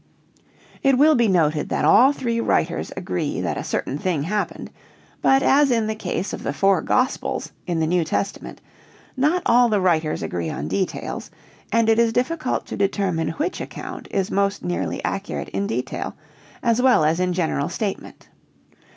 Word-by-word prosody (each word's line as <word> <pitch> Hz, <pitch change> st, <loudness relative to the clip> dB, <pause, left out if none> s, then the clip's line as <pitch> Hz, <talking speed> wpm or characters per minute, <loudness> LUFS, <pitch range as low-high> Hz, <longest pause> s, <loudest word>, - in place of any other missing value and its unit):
"] -, -, -28 dB
It 275 Hz, -1 st, +3 dB
will 305 Hz, +3 st, +6 dB
be 240 Hz, -5 st, +3 dB
noted 160 Hz, -5 st, +1 dB
that -, -, 0 dB
all 265 Hz, +3 st, +6 dB
three 235 Hz, -5 st, -2 dB
writers -, -, 0 dB
agree -, -, -2 dB
that -, -, -2 dB
a -, -, -4 dB
certain -, -, -3 dB
thing 175 Hz, -7 st, -1 dB
happened, 205 Hz, +5 st, -3 dB, 0.5 s
but 270 Hz, +1 st, +4 dB
as 285 Hz, +1 st, +4 dB
in 230 Hz, -3 st, +2 dB
the 220 Hz, -, -1 dB
case 195 Hz, -2 st, -3 dB
of -, -, -5 dB
the 140 Hz, -, -2 dB
four 195 Hz, +4 st, +3 dB
Gospels 255 Hz, 0 st, -1 dB, 0.2 s
in 170 Hz, -2 st, -1 dB
the 160 Hz, -, +2 dB
New 175 Hz, +1 st, +2 dB
Testament, 195 Hz, +5 st, -4 dB, 0.5 s
not 305 Hz, +7 st, +1 dB
all 240 Hz, 0 st, +5 dB
the 210 Hz, -2 st, +2 dB
writers 165 Hz, -4 st, +1 dB
agree 85 Hz, -2 st, -3 dB
on 75 Hz, -, -4 dB
details 190 Hz, -, -3 dB, 0.4 s
and 230 Hz, -1 st, +3 dB
it 225 Hz, 0 st, +4 dB
is 230 Hz, -1 st, +3 dB
difficult 280 Hz, +4 st, -1 dB
to -, -, -6 dB
determine 195 Hz, -5 st, 0 dB
which 320 Hz, +6 st, -3 dB
account -, -, -7 dB
is 195 Hz, 0 st, -1 dB
most 200 Hz, 0 st, 0 dB
nearly 90 Hz, -1 st, -2 dB
accurate -, -, -3 dB
in 100 Hz, +1 st, -2 dB
detail 125 Hz, +3 st, -3 dB, 0.5 s
as 235 Hz, 0 st, +2 dB
well 250 Hz, -12 st, +4 dB
as 160 Hz, +3 st, +2 dB
in 180 Hz, 0 st, +1 dB
general 165 Hz, -5 st, -1 dB
statement. 205 Hz, -3 st, -5 dB
200 Hz, 175 wpm, -22 LUFS, 165-245 Hz, 0.5 s, will